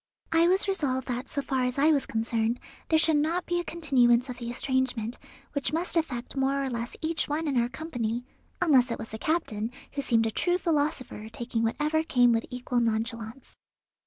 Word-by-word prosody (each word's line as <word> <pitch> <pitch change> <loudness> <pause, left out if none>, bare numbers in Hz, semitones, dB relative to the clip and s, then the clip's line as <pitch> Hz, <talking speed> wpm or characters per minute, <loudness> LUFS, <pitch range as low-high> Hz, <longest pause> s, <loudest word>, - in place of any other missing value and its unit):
I 330 +1 +5
was 380 +3 +3
resolved 275 -10 0
that 250 +2 -3
so 280 - -1
far 260 -1 0
as 250 +1 -1
I 300 +3 +5
was 285 -3 +1
concerned 225 +1 0 0.3
there 320 - +5
should 315 -1 +4
not 330 +4 0
be 350 0 0
a - - -2
continuance 255 -7 +3
of 245 -1 -6
the 235 -1 -5
estrangement, 250 -2 -1 0.3
which 285 -2 -1
must 340 +3 +1
affect 265 -8 -1
more 275 +1 +1
or 265 - -2
less 235 0 -4
each 320 +1 0
one 310 +2 -1
in 280 - 0
our 240 -1 +2
company, 245 -4 -3 0.4
unless 270 -8 +5
it 230 - -2
was 225 - -7
the 220 - -7
captain, 225 -10 -1 0.2
who 280 - -3
seemed 230 -4 +2
a 225 - 0
true 355 +9 +1
philosopher, 290 - -1
taking 235 0 -3
whatever 300 +7 +1
came 245 -6 +4
with 230 0 0
equal 250 0 -1
nonchalance. 230 +2 -2
260 Hz, 195 wpm, -28 LUFS, 235-315 Hz, 0.4 s, I